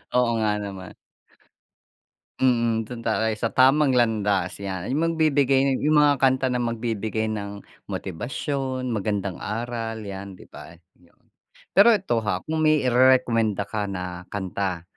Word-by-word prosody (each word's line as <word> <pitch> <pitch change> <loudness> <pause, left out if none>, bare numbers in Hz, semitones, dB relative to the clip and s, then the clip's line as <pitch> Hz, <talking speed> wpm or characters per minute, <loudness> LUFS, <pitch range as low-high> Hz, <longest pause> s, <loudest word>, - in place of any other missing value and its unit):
Oo 125 -1 +3
nga 105 -1 +1
naman. 95 -2 -8 1.4
Mm, 115 -3 +2
dun 120 0 -8
tayo 110 -1 0
sa 110 +1 -2
tamang 135 0 +4
landas. 105 -5 0
'Yan 95 -3 -4
yung 155 +3 +1
magbibigay 140 -3 +3
yung 150 +1 +3
mga 145 -3 +4
kanta 130 0 +3
na 125 - 0
magbibigay 110 -2 -2
ng 100 -1 -6 0.2
motibasyon, 130 - -4
magandang 100 -3 -2
aral 115 0 -4
'yan 95 -1 -8
'di - - -14
ba? - - -12 0.3
Yun. 85 - -26 0.5
Pero 220 +4 +6
ito 180 - 0
ha, 95 -2 -1
kung 160 0 -3
may 155 -1 +3
irerekomenda 120 -4 +3
ka 105 +1 -3
na 90 -2 -6
kanta 95 -3 -3
115 Hz, 135 wpm, -24 LUFS, 100-130 Hz, 1.4 s, Pero